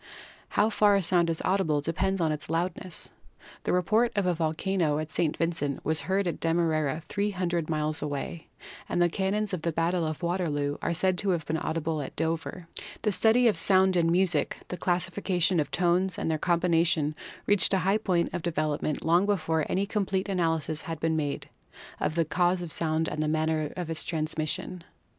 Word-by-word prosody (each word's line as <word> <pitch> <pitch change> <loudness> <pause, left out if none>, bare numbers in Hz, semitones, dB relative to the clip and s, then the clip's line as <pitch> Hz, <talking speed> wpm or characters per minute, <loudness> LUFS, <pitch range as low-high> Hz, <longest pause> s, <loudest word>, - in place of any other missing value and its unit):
How 215 +2 +4
far 205 -1 +4
a 195 - +1
sound 170 -1 +2
is 165 - -2
audible 185 -6 +2
depends 185 +6 -1
upon 160 -2 +1
its 150 0 -5
loudness. 175 +1 -3 0.5
The - - +1
report 215 +7 +2
of 200 -2 +1
a 180 - +2
volcano 160 0 0
at 155 0 -4
St. 155 -2 0
Vincent 160 -4 -2
was 160 +1 +1
heard 195 +1 +2
at 175 - -2
Demerara, 160 -2 0
300 180 -5 -1
miles 155 0 -1
away, 150 +2 -4 0.4
and - - 0
the 175 0 +4
cannons 200 +3 -1
of 180 - -2
the 170 - -1
battle 170 +2 0
of 155 +2 -4
Waterloo 150 -5 -1
are 170 - -1
said 185 +1 +1
to 200 - 0
have 170 -4 0
been 160 +2 -1
audible 160 -1 -2
at 135 - -7
Dover. 165 +2 -3 0.4
The 210 - +2
study 230 +5 +4
of 220 - +2
sound 190 -1 +4
in 165 -1 +3
music, 175 -4 +1
the - - -3
classification 180 0 0
of 150 -2 0
tones 180 +4 +1
and 160 - -1
their 155 - -1
combination 170 -3 +2 0.3
reached 205 -3 +4
a 195 - +4
high 200 +3 +3
point 180 -5 0
of 175 - -2
development 155 -2 -2
long 175 +4 +3
before 160 -6 0
any 195 +2 +1
complete 195 -2 -1
analysis 165 -4 0
had 165 -4 -5
been 160 0 0
made 145 -2 -2 0.5
of 155 - -1
the 165 -1 +2
cause 175 +3 +1
of 170 - -6
sound 160 0 0
and 155 - -3
the 155 - 0
manner 155 -1 0
of 175 -2 -3
its 160 - -1
transmission. 155 +2 -2
170 Hz, 190 wpm, -28 LUFS, 155-185 Hz, 0.5 s, How